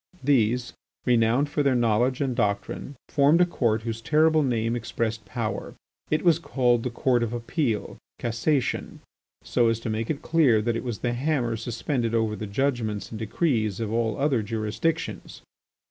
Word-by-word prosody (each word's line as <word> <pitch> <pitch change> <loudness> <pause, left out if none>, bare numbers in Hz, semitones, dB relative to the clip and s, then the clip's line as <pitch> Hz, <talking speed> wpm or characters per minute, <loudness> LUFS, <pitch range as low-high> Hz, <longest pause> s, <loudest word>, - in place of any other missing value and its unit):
These, 125 -3 +2 0.3
renowned 120 +3 +3
for 145 +1 -1
their 140 -2 +3
knowledge 120 +3 +2
and 130 -3 0
doctrine, 105 +5 -2
formed 145 +3 +4
a 180 - +6
court 115 -10 0
whose 115 -1 -4
terrible 155 +4 +3
name 115 -4 0
expressed 115 -2 -3
power. 110 +1 -4 0.3
It 155 - +1
was 170 -2 +5
called 125 -7 +1
the 125 - -2
Court 120 0 +1
of 115 0 -1
Appeal 120 -1 -2 0.2
(Cassation) 120 +4 -1 0.4
so 120 -2 +2
as 115 0 +1
to 115 - -3
make 110 +1 -2
it 150 -2 -3
clear 150 -9 +4
that 115 +2 0
it - - -3
was 120 -4 -3
the 120 - +1
hammer 125 -3 0
suspended 115 +1 -2
over 110 -2 +1
the 105 - -5
judgments 110 -2 -1
and 110 - -6
decrees 110 - 0
of 110 -1 -2
all 115 -2 0
other 135 -4 +1
jurisdictions. 110 +10 -3
120 Hz, 165 wpm, -25 LUFS, 110-140 Hz, 0.4 s, a